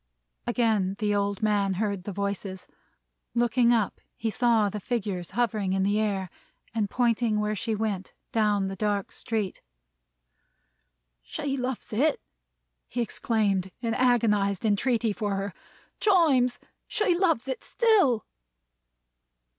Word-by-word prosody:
Again 220 -6 +1
the 210 -1 0
old 200 0 -1
man 200 -3 +2
heard 200 -2 -2
the 205 - -3
voices. 200 -1 -3 0.7
Looking 240 0 +3
up, 225 -4 +1 0.2
he 225 0 -1
saw 230 -2 +3
the 210 +1 -4
figures 195 -5 -3
hovering 215 -5 +1
in 190 0 +1
the 205 +2 +2
air, 195 -4 -1 0.4
and 215 -3 0
pointing 230 -2 +1
where 210 0 0
she 220 +2 -1
went, 205 -3 -2 0.2
down 210 -3 +2
the 195 - -4
dark 205 -1 -1
street. 215 -5 -3 1.6
"She 270 - -3
loves 255 -3 -4
it!" 280 +7 +2 0.7
he 245 - -5
exclaimed 210 -5 0
in 230 -2 -1
agonized 215 -5 +2
entreaty 225 +1 +2
for 205 -2 -2
her. 195 -1 -3 0.5
"Chimes! 290 - +4 0.3
she 425 -5 +2
loves 335 -9 +1
it 260 - -4
still!" 390 - +3
215 Hz, 125 wpm, -27 LUFS, 200-240 Hz, 1.6 s, Chimes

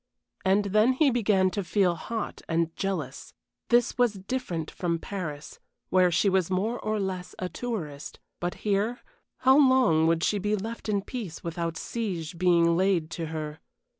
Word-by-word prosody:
And 195 +2 +3
then 215 +5 +4
he 275 +1 +3
began 200 -6 +2
to 200 +3 -2
feel 185 0 +2
hot 220 +6 -5
and 165 0 0
jealous! 170 -9 -4 0.3
This 240 +1 +3
was 245 -3 +4
different 190 -5 -4
from 170 -2 -1
Paris, 160 -5 -6 0.3
where 185 -1 +5
she 175 +4 +2
was 190 -3 +2
more 210 +6 0
or 215 0 -1
less 185 -2 -4
a 185 - -3
tourist; 165 -14 -5 0.2
but 175 0 -2
here, 210 +4 0 0.4
how 260 +2 +6
long 255 - +5
would 165 0 +2
she 205 - +1
be 210 +2 0
left 225 +2 -5
in 200 -2 +1
peace 210 -11 -6
without 165 -1 -3
siege 180 -8 -4
being 170 -2 +4
laid 180 -3 +1
to 165 -1 -4
her? 155 0 -5
190 Hz, 165 wpm, -27 LUFS, 170-215 Hz, 0.4 s, how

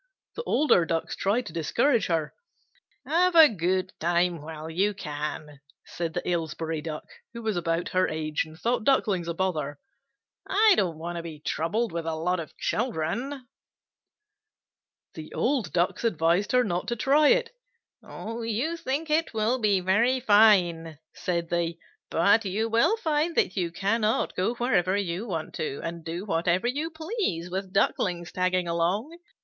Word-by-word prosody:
The - - -3
older 265 - +3
Ducks 165 0 -2
tried 225 +5 0
to 160 - -8
discourage 215 - +1
her. 160 -3 -1 0.7
"Have 355 +2 +2
a 320 -2 +10
good 185 - -1
time 175 0 +1
while 155 0 -8
you 195 +6 0
can," 150 -3 -5 0.3
said 165 -2 -5
the 175 - -3
Aylesbury 165 -2 -2
Duck, 155 -1 -5 0.3
who 235 - -7
was 220 -2 -1
about 165 0 -1
her 185 0 +2
age, 155 -1 -1
and 155 0 -13
thought 235 +5 0
Ducklings 205 -9 +2
a 170 - -3
bother. 155 -6 -2 0.7
"I 425 +2 +5
don't 175 - 0
want 170 +2 -5
to - - -3
be 160 -3 -8
troubled 175 +10 -1
with 165 -1 -4
a 160 - -1
lot 180 +3 -1
of 160 - -8
children." 240 - -2 1.7
The 155 -1 -9
old 240 - 0
Ducks 175 +7 0
advised 175 0 +1
her 250 0 +5
not 180 -5 -2
to 240 - -1
try 285 +6 +4
it. 485 +3 +3 0.5
"You 230 +8 -4
think 300 +2 -3
it 315 -5 +1
will 225 +4 +1
be 205 -4 +2
very 230 +8 +2
fine," 185 - +4 0.2
said 170 -2 -2
they, 170 -1 -1 0.3
"but 200 +7 +4
you 210 +4 -1
will 235 - +3
find 320 -3 0
that 185 - +2
you 180 -4 0
cannot 215 +5 0
go 195 +6 0
wherever 200 -6 +1
you 195 +2 -3
want 165 -5 -4
to, 140 -3 -3
and 165 0 -5
do 170 +4 -5
whatever 175 +1 +1
you 290 +6 -1
please 315 - -3
with 190 0 -4
Ducklings 175 -3 0
tagging 185 -1 0
along. 190 - -1
185 Hz, 160 wpm, -26 LUFS, 165-235 Hz, 1.7 s, a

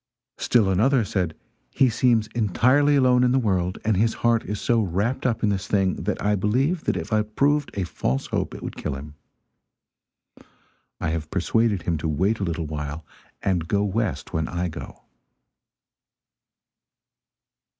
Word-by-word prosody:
Still 115 -5 +3
another 115 +5 +3
said: 90 -5 -2 0.3
"He 135 - +3
seems 115 -1 +2
entirely 125 +7 +3
alone 125 -2 +4
in 125 - +3
the - - +3
world, 95 -7 0
and 110 -1 +2
his 110 +4 +1
heart 115 -1 +3
is 105 -1 -4
so 115 -2 +2
wrapped 105 +8 -1
up 115 -3 -1
in 105 - +3
this 95 -2 -2
thing 95 -2 +2
that 105 - -1
I 105 0 +1
believe 130 - 0
that - - 0
if - - -4
it 105 0 0
proved 145 +1 +2
a 95 - 0
false 70 -6 -2
hope, - - -2
it - - -9
would - - -5
kill - - -4
him; 75 +2 -9 1.9
I - - -1
have 80 -2 -3
persuaded 105 +3 +1
him 85 -3 -1
to 80 - -2
wait 95 +9 +1
a - - -2
little 85 -2 -2
while 75 +1 -5 0.4
and 90 -4 0
go 100 +1 +1
west 105 +2 -2
when 80 -1 -1
I 85 0 -2
go." 80 - -9
105 Hz, 165 wpm, -24 LUFS, 85-120 Hz, 1.9 s, alone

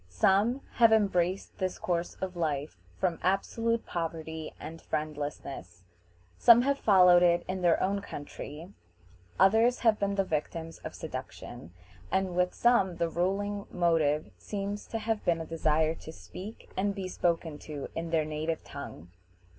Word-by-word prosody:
Some 200 - +2 0.2
have 230 -2 +7
embraced 190 -4 +1
this 185 -1 -1
course 175 -1 -2
of 185 -1 -3
life 150 - -2 0.2
from 175 -3 0
absolute 225 +5 0
poverty 160 -2 -4
and 165 +1 -8
friendlessness; 145 - -5 0.6
some 235 +1 +8
have 280 +1 +1
followed 180 -4 +6
it 175 -1 +3
in 185 0 -3
their 175 -2 +4
own 200 +1 0
country; 155 +2 -8 0.7
others 225 +6 +4
have 225 -3 +4
been 200 0 0
the 195 - +2
victims 165 0 -4
of - - -8
seduction; 80 - -7 0.4
and 190 -2 0
with 180 0 +1
some 215 -7 +3
the 170 0 0
ruling 200 +4 -1
motive 155 -7 +1
seems 200 - -4
to 225 - -3
have 225 -1 -2
been 170 -1 +2
a 165 - -4
desire 160 -1 +1
to 160 - -10
speak 200 +6 -10
and 200 +1 0
be 190 -2 -4
spoken 165 -4 -1
to 145 -3 -7
in 165 0 -4
their 160 -2 +1
native 155 +1 -3
tongue. 110 - -9
175 Hz, 150 wpm, -29 LUFS, 160-200 Hz, 0.7 s, some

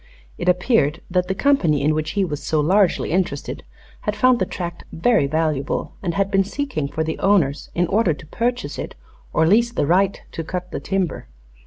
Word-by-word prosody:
It - - +1
appeared 180 - +2
that 180 0 +1
the 190 - -1
company 175 - +2
in 155 +2 +3
which 155 0 -2
he 195 - +3
was 150 -5 -4
so 155 - 0
largely 180 +2 +2
interested 170 -5 -2 0.4
had - - -2
found 255 -2 +4
the - - 0
tract 175 -1 -5
very 205 -3 +2
valuable, 155 -2 -1
and 170 -4 -2
had 195 +1 0
been 195 -1 +4
seeking 250 - -3
for 160 +3 -2
the 160 0 -3
owners 175 -9 +2
in 175 - +2
order 185 -3 +2
to - - -13
purchase 245 +9 -2
it - - -6 0.4
or 160 - +3
lease 230 +7 +4
the 190 - 0
right 190 +5 +2
to 165 - -4
cut 180 +2 -5
the - - -3
timber. 190 - -2
180 Hz, 195 wpm, -21 LUFS, 155-200 Hz, 0.4 s, found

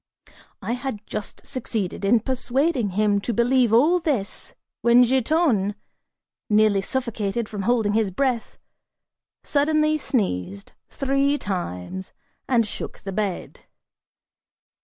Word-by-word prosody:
I - - -2
had 245 -4 -4
just 210 - -6
succeeded 225 -8 -3
in 220 +3 +4
persuading 260 - 0
him 205 -1 +2
to 235 +2 -3
believe 245 0 +3
all 300 +11 +5
this 265 - -2 0.3
when 240 +1 +6
Giton, 250 - +2 0.7
nearly 210 -2 +4
suffocated 230 -2 -2
from 210 -3 -5
holding 225 -4 +2
his 220 -2 +2
breath, 245 +3 -1 0.9
suddenly 305 +1 +2
sneezed 100 - -2 0.2
three 275 +1 +1
times, 185 - -5 0.3
and 235 -3 +3
shook 210 - -7
the 195 - -5
bed. 195 -1 -3
230 Hz, 110 wpm, -23 LUFS, 205-265 Hz, 0.9 s, when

